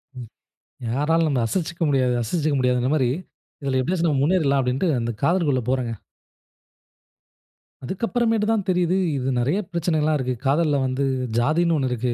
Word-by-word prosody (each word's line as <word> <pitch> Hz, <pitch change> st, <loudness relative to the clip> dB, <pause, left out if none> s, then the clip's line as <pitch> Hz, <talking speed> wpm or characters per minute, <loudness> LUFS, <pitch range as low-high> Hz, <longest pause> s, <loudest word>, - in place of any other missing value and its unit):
ம். 125 Hz, -2 st, -8 dB, 0.6 s
யாராலும் 155 Hz, +7 st, +1 dB
நம்மள 130 Hz, -5 st, +1 dB
அசச்சுக்க 175 Hz, +1 st, -3 dB
முடியாது, 130 Hz, -3 st, +2 dB
அசச்சுக்க 150 Hz, +5 st, -1 dB
முடியாதுங்குற 125 Hz, +1 st, +1 dB
மாரி 130 Hz, -4 st, +2 dB, 0.5 s
இதில 135 Hz, -1 st, 0 dB
எப்டியாச்சும் 170 Hz, +5 st, 0 dB
நம்ம 140 Hz, -3 st, +1 dB
முன்னேறிறலாம் 145 Hz, -4 st, +2 dB
அப்டின்ட்டு 130 Hz, +8 st, 0 dB
அந்த 115 Hz, 0 st, -2 dB
காதலுக்குள்ள 150 Hz, -4 st, +2 dB
போறேங்க. 130 Hz, -3 st, -1 dB, 1.9 s
அதுக்கு 190 Hz, -, -3 dB
அப்புறமேட்டு 225 Hz, -3 st, +1 dB
தான் 215 Hz, -4 st, 0 dB
தெரியிது, 180 Hz, 0 st, +2 dB, 0.2 s
இது 130 Hz, 0 st, -2 dB
நெறைய 140 Hz, +10 st, +1 dB
பிரச்சனைலாம் 160 Hz, -3 st, +1 dB
இருக்கு. 130 Hz, -2 st, -2 dB
காதல்ல 145 Hz, +1 st, +2 dB
வந்து 130 Hz, +2 st, -1 dB, 0.4 s
ஜாதின்னு 160 Hz, +6 st, +2 dB
1 135 Hz, -3 st, 0 dB
இருக்கு. 125 Hz, 0 st, -1 dB
145 Hz, 145 wpm, -23 LUFS, 130-170 Hz, 1.9 s, முடியாது